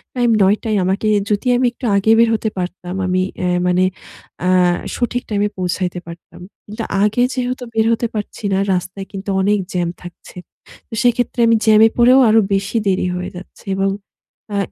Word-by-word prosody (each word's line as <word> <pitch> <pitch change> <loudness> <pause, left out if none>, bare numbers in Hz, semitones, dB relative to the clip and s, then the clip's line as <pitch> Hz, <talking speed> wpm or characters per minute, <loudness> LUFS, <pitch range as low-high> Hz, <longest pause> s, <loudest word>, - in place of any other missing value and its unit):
Time 245 -1 +2
৯:০০ 210 +4 +1
ই। - - +2
আমাকে 195 +4 0 0.2
যদি 205 +5 -1
আমি 250 - +1
একটু 250 - -8
আগে 200 +2 +3
বের 230 0 +5
হতে 220 0 -2
পারতাম, 180 0 -5
আমি 185 0 +1 0.2
এ - - +1 0.2
মানে 180 +1 +3 0.6
আ - - +3 0.5
সঠিক 245 0 -2
টাইমে 205 -1 +1
পৌঁছাইতে 180 0 -2
পারতাম। 170 +1 -12 0.2
কিন্তু 215 +2 -6 0.2
আগে 215 +4 +2
যেহেতু 255 0 -3
বের 220 0 +2
হতে 235 +1 -1
পারছি 210 +1 -6
না, - - +2 0.2
রাস্তায় 185 +2 -4
কিন্তু 195 +1 -6
অনেক 205 +1 +2
জ্যাম 175 -2 0
থাকছে। 175 +1 -12 0.5
তো 230 - -13
সেক্ষেত্রে 245 0 +1
আমি 230 - +4
জ্যামে 220 0 +6
পড়েও 250 +2 +6
আরো 220 +1 +5
বেশি 195 +4 -1
দেরি 185 -1 +1
হয়ে 180 0 -4
যাচ্ছে। 185 - -13
এবং 195 0 +1 0.7
আ - - 0
205 Hz, 175 wpm, -18 LUFS, 185-230 Hz, 0.7 s, জ্যামে